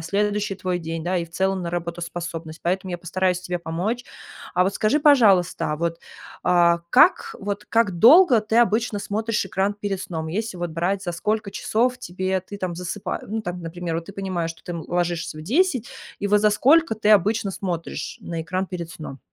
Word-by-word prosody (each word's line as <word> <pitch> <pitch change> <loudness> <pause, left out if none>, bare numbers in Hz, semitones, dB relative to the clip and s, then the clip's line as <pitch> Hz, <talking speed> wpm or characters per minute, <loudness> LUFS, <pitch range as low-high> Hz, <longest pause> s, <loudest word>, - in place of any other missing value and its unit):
следующий 205 +4 -1
твой 185 -2 -2
день, 165 -1 -5
да, 180 +2 -1
и 170 - 0
в 165 - -17
целом 190 +1 0
на 170 - -3
работоспособность. 170 -1 -5
Поэтому 185 +1 -1
я 175 - -3
постараюсь 180 +1 0
тебе 180 -1 -3
помочь. 185 +9 -3 0.5
А 180 - +4
вот 190 - +1
скажи, 255 +8 +2
пожалуйста, 205 - +4
а 150 - -2
вот, 165 +1 -2 0.5
а, 175 -1 +4
как 305 +8 +5
вот 205 +1 -4
как 205 -7 +2
долго 260 - +7
ты 220 +2 +1
обычно 225 -2 +2
смотришь 220 +2 -1
экран 195 +2 -1
перед 205 -2 -3
сном? 160 -4 -4
Если 210 +2 -3
вот 175 -1 -3
брать, 180 +4 -1
за 175 - -3
сколько 215 +4 -1
часов 245 +5 0
тебе 185 -3 -2
ты 200 +2 -10
там 180 -3 -3
засыпаешь, 180 +3 -4
ну, 220 +1 -3
там, 180 -2 -5
например, 165 0 -4
вот, 165 - -4
ты 200 - -9
понимаешь, 185 -4 -3
что 165 - -12
ты, - - -8
м, 170 -2 -5
ложишься 175 -2 -2
в 155 - -7
10, 260 - +1 0.3
и 205 - -1
вот 210 0 +4
за 210 - +4
сколько 280 +6 +4
ты 215 -1 -1
обычно 210 0 +3
смотришь 180 -3 -4
на 165 -1 -5
экран 185 +3 -2
перед 175 -3 -6
сном? 155 -6 -8
185 Hz, 200 wpm, -23 LUFS, 170-210 Hz, 0.5 s, долго